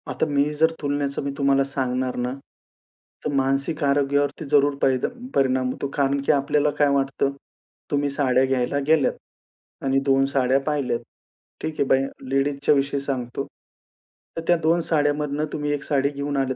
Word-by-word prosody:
आता -, -, 0 dB
मी 145 Hz, -2 st, +2 dB, 0.2 s
जर 160 Hz, +1 st, +4 dB
तुलण्याचं 145 Hz, -1 st, -1 dB
मी 140 Hz, -, -2 dB
तुम्हाला 140 Hz, -1 st, +3 dB
सांगणार 130 Hz, -2 st, -2 dB
ना, 125 Hz, 0 st, -1 dB, 1.0 s
तर -, -, 0 dB
मानसिक 140 Hz, +4 st, 0 dB
आरोग्यावरती 140 Hz, +1 st, +1 dB
जरूर 145 Hz, -1 st, +4 dB
परी 130 Hz, -1 st, +3 dB, 0.4 s
परिणाम 130 Hz, -1 st, +2 dB
होतो, 140 Hz, -, -4 dB
कारण 140 Hz, 0 st, +1 dB
की -, -, +4 dB
आपल्याला 145 Hz, +1 st, +2 dB
काय 145 Hz, -, +5 dB
वाटतं, 135 Hz, 0 st, 0 dB, 0.6 s
तुम्ही 145 Hz, 0 st, +1 dB
साड्या 135 Hz, -2 st, +2 dB
घ्यायला 130 Hz, +1 st, 0 dB
गेल्यात 155 Hz, -3 st, +3 dB, 0.7 s
आणि 135 Hz, 0 st, +3 dB
2 135 Hz, -1 st, +4 dB
साड्या 130 Hz, 0 st, +3 dB
पाहिल्यात. 140 Hz, -5 st, 0 dB, 0.6 s
ठीक 155 Hz, -, -3 dB
आहे -, -, +4 dB
बाया 135 Hz, +1 st, +3 dB, 0.2 s
लेडीजच्या 140 Hz, +2 st, +2 dB
विषयी 140 Hz, 0 st, 0 dB
सांगतो. 135 Hz, -1 st, -3 dB, 0.9 s
तर -, -, -1 dB
त्या 175 Hz, -, +5 dB
2 165 Hz, +2 st, +3 dB
साड्यांमधून 150 Hz, -1 st, +1 dB
तुम्ही 150 Hz, -1 st, -2 dB
1 145 Hz, -1 st, -3 dB
साडी 140 Hz, -1 st, +1 dB
घेऊन 145 Hz, 0 st, -3 dB
आलेत. 135 Hz, -1 st, 0 dB
140 Hz, 155 wpm, -23 LUFS, 135-145 Hz, 1.0 s, काय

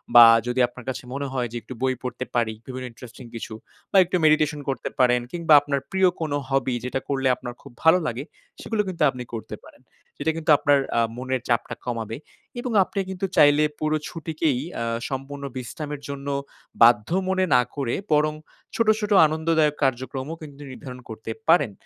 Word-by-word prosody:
বা 120 Hz, -1 st, +12 dB, 0.2 s
যদি 125 Hz, +1 st, -1 dB
আপনার 120 Hz, 0 st, -13 dB
কাছে 130 Hz, -, -4 dB
মনে 140 Hz, +1 st, -3 dB
হয় 125 Hz, -2 st, -1 dB
যে 120 Hz, -, -4 dB
একটু 130 Hz, -, -9 dB
বই 130 Hz, 0 st, +1 dB
পড়তে 125 Hz, 0 st, -4 dB
পারি 115 Hz, -2 st, +1 dB
বিভিন্ন 130 Hz, 0 st, -5 dB
ইন্টারেস্টিং 120 Hz, +1 st, -12 dB
কিছু 115 Hz, -1 st, -6 dB, 0.4 s
বা -, -, +4 dB
একটু 180 Hz, -, -2 dB
মেডিটেশন 155 Hz, -1 st, +3 dB
করতে 135 Hz, -, -2 dB
পারেন। 125 Hz, -1 st, +4 dB
কিংবা 170 Hz, -3 st, +2 dB
আপনার 145 Hz, -1 st, -1 dB
প্রিয় 190 Hz, -1 st, +4 dB
কোন 155 Hz, -2 st, -2 dB, 0.2 s
হবি 135 Hz, -2 st, +1 dB
যেটা 130 Hz, +1 st, -2 dB
করলে 135 Hz, -1 st, +1 dB
আপনার -, -, -26 dB, 0.2 s
খুব 140 Hz, -, -13 dB
ভালো 165 Hz, +3 st, +6 dB
লাগে 125 Hz, +2 st, -3 dB, 0.4 s
সেগুলো 220 Hz, -2 st, 0 dB
কিন্তু 170 Hz, -4 st, -1 dB
আপনি 125 Hz, -2 st, -6 dB
করতে 115 Hz, -, -5 dB
পারেন। -, -, -17 dB, 0.4 s
সেটা 155 Hz, +3 st, 0 dB
কিন্তু 155 Hz, -1 st, +1 dB
আপনার 145 Hz, -1 st, +3 dB, 0.2 s
আ -, -, +4 dB, 0.2 s
মনের 130 Hz, 0 st, -2 dB
চাপটা 120 Hz, -1 st, 0 dB
কমাবে। 115 Hz, -2 st, -3 dB, 0.4 s
এবং 245 Hz, 0 st, -3 dB
আপনি 200 Hz, +2 st, -5 dB
কিন্তু 190 Hz, 0 st, -3 dB
চাইলে 145 Hz, +1 st, +6 dB, 0.2 s
পুরো 155 Hz, 0 st, +1 dB
ছুটিকেই 160 Hz, -4 st, -1 dB, 0.2 s
আ -, -, 0 dB, 0.3 s
সম্পূর্ণ 140 Hz, +1 st, -5 dB
বিশ্রামের 145 Hz, +3 st, -6 dB
জন্য 140 Hz, 0 st, -6 dB, 0.5 s
বাধ্য 115 Hz, -2 st, +6 dB, 0.2 s
মনে 190 Hz, 0 st, +2 dB
না 125 Hz, -, +6 dB
করে 135 Hz, -5 st, -1 dB, 0.2 s
বরং 150 Hz, 0 st, +3 dB, 0.4 s
ছোট, 230 Hz, -1 st, +1 dB
ছোট 210 Hz, -1 st, -3 dB, 0.2 s
আনন্দদায়ক 155 Hz, -1 st, +1 dB
কার্যক্রমও 130 Hz, +3 st, -2 dB
কিন্তু 145 Hz, -2 st, -11 dB
নির্ধারণ 125 Hz, -1 st, -9 dB
করতে 110 Hz, 0 st, -6 dB, 0.2 s
পারেন। 150 Hz, -8 st, +4 dB
140 Hz, 180 wpm, -24 LUFS, 125-155 Hz, 0.5 s, বা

